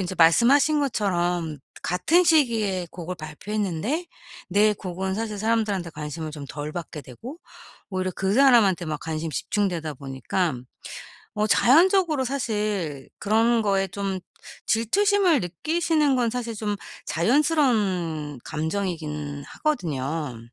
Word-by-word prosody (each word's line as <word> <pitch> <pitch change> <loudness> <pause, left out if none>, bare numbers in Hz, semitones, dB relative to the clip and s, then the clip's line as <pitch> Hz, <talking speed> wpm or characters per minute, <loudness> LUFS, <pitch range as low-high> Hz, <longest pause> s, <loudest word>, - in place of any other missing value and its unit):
인제 185 0 -3
말씀하신 270 - +5
것처럼 175 - -1 0.2
같은 325 - +2
시기에 225 - +2
곡을 180 +1 -6
발표했는데 205 - -3 0.4
내 210 +1 +4
곡은 190 0 -4
사실 215 -1 -3
사람들한테 210 -5 0
관심을 155 +1 -6
좀 150 -2 -7
덜 150 +2 -5
받게 160 -3 -6
되고 230 - -10 0.5
오히려 185 0 -1
그 190 0 0
사람한테 230 -10 +5
막 155 -1 -3
관심 160 0 -3
집중되다 170 - -2
보니깐 135 +1 -3 0.7
어 210 0 +1
자연적으로 320 - +4
사실 210 - -2
그런 225 +2 +2
거에 195 -2 +1
좀 195 0 -3 0.5
질투심을 365 - +3
느끼시는 300 - +1
건 240 -2 +1
사실 235 -1 -4
좀 210 -1 -2 0.3
자연스러운 195 - +1
감정이긴 155 -4 -3
하거든요. 155 - -2
195 Hz, 280 characters per minute, -24 LUFS, 160-240 Hz, 0.7 s, 말씀하신